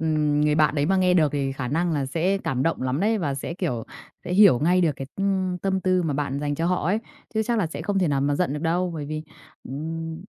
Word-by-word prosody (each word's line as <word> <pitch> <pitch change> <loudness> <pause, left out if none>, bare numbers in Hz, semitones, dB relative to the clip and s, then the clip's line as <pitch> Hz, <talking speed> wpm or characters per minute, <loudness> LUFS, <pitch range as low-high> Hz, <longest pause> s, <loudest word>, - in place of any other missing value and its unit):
ừm, 150 -2 +1
người 150 0 +3
bạn 155 -1 +3
đấy 145 0 +1
mà 190 +1 +2
nghe 185 -1 +3
được 155 -5 +3
thì 140 -2 -1
khả 130 -2 -4
năng 165 +4 0
là 140 -3 -1
sẽ 175 +7 0
cảm 130 -8 -2
động 165 -5 0
lắm 130 +3 -1
đấy, 220 +2 +2
và 145 -6 -1
sẽ, 155 +5 -5
kiểu, 150 - -2 0.4
sẽ 180 - -4
hiểu 190 -10 +7
ngay 180 +4 +3
được 160 -4 +2
cái, 135 - -6
ừm, 190 -2 0
tâm 190 0 -1
tư 185 -1 +2
mà 155 -4 -1
bạn 140 -1 -2
dành 145 0 -1
cho 165 +3 -1
họ 180 -3 0
ấy 205 +4 +2 0.4
chứ 220 - +2
chắc 235 0 0
là 180 - +1
sẽ 155 0 -6
không 200 +1 0
thể 180 -4 +2
nào 140 -1 +1
mà 145 +1 +1
giận 175 -2 0
được 150 - -5
đâu. 175 +2 0
Bởi 150 -2 -4
vì, 155 +1 -4 0.5
ừm, 160 +4 -5
160 Hz, 270 wpm, -24 LUFS, 145-185 Hz, 0.5 s, hiểu